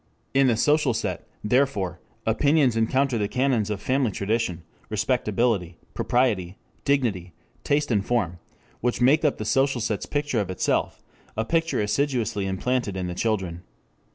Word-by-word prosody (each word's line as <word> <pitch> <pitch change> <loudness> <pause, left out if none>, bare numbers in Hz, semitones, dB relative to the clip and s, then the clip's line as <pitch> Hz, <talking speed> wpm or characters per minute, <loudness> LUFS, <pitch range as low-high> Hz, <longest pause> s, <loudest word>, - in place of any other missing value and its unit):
In 135 0 +4
the 115 -3 +2
social 145 -1 +3
set, - - -3 0.2
therefore, 105 - +1 0.3
opinions 135 +2 +3
encounter 125 +2 +1
the 105 - 0
canons 125 -3 +1
of 105 -2 -2
Family 130 +2 +1
Tradition, 100 -4 -1 0.3
Respectability, 100 -8 0 0.2
Propriety, 105 -8 0 0.3
Dignity, 110 - 0 0.3
Taste 145 -1 +1
and 105 -3 +2
Form, 100 -8 -1 0.4
which 125 +1 -1
make 140 +6 +4
up 150 - +2
the 110 - -4
social 135 +2 +2
set's 105 -2 -2
picture 145 -5 -1
of 100 -3 -2
itself, 95 - -1 0.3
a 110 - 0
picture 165 +4 +1
assiduously 110 -2 0
implanted 100 +1 -1
in 90 - -2
the 90 - -3
children. 95 -4 -1
115 Hz, 145 wpm, -25 LUFS, 100-135 Hz, 0.4 s, In